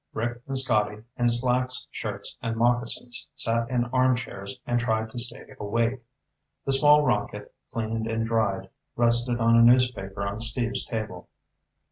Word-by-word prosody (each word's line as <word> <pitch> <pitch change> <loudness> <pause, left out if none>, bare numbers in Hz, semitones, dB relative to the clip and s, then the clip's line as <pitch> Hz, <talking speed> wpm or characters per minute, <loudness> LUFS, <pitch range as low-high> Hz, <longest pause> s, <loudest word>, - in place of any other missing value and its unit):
Rick 120 +2 -3
and 135 -1 -1
Scotty, 105 -5 +1
in 120 -1 +2
slacks, 125 +3 +1
shirts, 100 -2 -5
and 115 -1 -2
moccasins, 120 +1 0
sat 115 +1 0
in 120 -2 0
armchairs 125 -4 0
and 120 0 +1
tried 110 -1 -1
to 120 - -5
stay 120 0 -3
awake. 115 +4 -1 0.6
The 135 - 0
small 150 +2 +6
rocket, 105 -5 -2 0.2
cleaned 110 0 -3
and 115 0 -1
dried, 100 -4 -1 0.3
rested 120 +1 +3
on 115 0 +4
a 115 - +6
newspaper 115 -5 +3
on 100 +2 -4
Steve's 115 +1 0
table. 110 -6 -5
115 Hz, 145 wpm, -26 LUFS, 110-125 Hz, 0.6 s, small